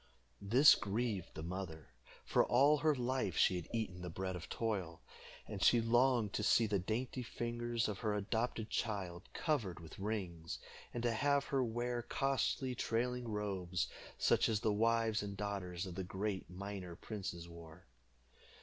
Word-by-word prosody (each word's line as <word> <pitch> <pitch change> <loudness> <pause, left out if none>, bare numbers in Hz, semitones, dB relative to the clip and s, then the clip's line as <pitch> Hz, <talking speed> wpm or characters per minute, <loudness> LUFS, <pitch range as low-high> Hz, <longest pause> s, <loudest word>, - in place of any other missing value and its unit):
This 125 +9 +8
grieved 105 -3 -2
the 80 - -5
mother, 85 -4 -5 0.4
for - - +4
all 140 +4 +5
her 155 0 +3
life 125 -7 -1
she 95 - +5
had 85 - -6
eaten 105 -6 -2
the 90 - -4
bread 95 +2 -3
of 90 -1 -7
toil, 95 -8 -2 0.5
and - - -5
she 120 - +6
longed 120 -2 +3
to - - 0
see 115 +2 +4
the 105 -2 +1
dainty 120 +7 -2
fingers 120 0 -2
of 105 -3 -3
her 105 -3 0
adopted 110 +2 -1
child 95 -5 -2
covered 115 - -1
with 80 +1 -11
rings, 95 -6 -3 0.3
and 120 - -4
to 120 - +3
have 140 +4 +2
her 135 -2 +1
wear 120 +1 -1
costly 135 +1 0
trailing 125 +1 -1
robes, 95 -4 -2 0.3
such - - +3
as 110 -2 +1
the 110 -2 +2
wives 115 0 +2
and 100 -1 -5
daughters 95 -3 -3
of 90 - -6
the 95 +2 -3
great 95 +2 -3
miner 95 -1 -6
princes 90 -4 -5
wore. 85 +1 -12
105 Hz, 160 wpm, -36 LUFS, 95-120 Hz, 0.5 s, This